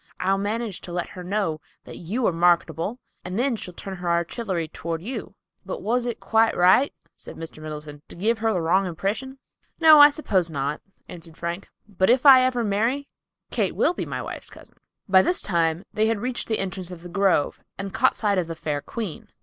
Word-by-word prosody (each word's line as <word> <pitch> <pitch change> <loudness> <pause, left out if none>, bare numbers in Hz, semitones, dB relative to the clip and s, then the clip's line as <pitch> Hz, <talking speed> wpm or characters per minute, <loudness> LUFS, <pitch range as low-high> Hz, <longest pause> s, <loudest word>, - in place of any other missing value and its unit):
I'll 195 +1 +1
manage 210 0 -3
to 175 - -9
let 175 0 -3
her 180 - -9
know 180 -5 -1 0.2
that - - -10
you 220 +9 -2
are - - +3
marketable, 170 +4 +1 0.3
and 180 +2 -5
then 250 +1 +1
she'll 180 -5 -8
turn 190 -1 -7
her 175 -1 -3
artillery 170 +1 -1
toward 165 +1 -5
you." 225 -3 -6 0.3
"But 190 - -6
was 240 +4 0
it 235 - -3
quite 225 0 +2
right," 185 +10 +5 0.2
said - - -11
Mr. 160 -1 -9
Middleton, 150 -1 -8
"to - - -7
give 220 +6 0
her 225 - 0
a 215 -5 +1
wrong 185 +4 +2
impression?" 205 +10 -3 0.4
"No, 315 -2 +8
I 290 - +10
suppose 195 - 0
not," 145 0 -3 0.3
answered 165 -2 -11
Frank. 170 +3 -5 0.2
"But 190 -1 +1
if 250 +3 +3
I 265 -2 +10
ever 255 -2 +1
marry, 230 +7 0 0.4
Kate - - 0
will - - +2
be - - -4
my - - -4
wife's - - -7
cousin." - - -16 0.3
By 190 -1 +6
this 355 - +1
time 170 -1 0
they 215 +1 +2
had 225 -1 +1
reached 245 +2 -3
the 220 - +1
entrance 185 -2 -4
of 175 -2 -10
the - - -7
grove 185 -4 +1 0.2
and 195 0 -6
caught 245 +4 +3
sight 205 -3 +1
of 175 - -2
the 165 - -5
fair 150 -3 -3
queen. 205 +1 -6
195 Hz, 205 wpm, -24 LUFS, 170-230 Hz, 0.4 s, I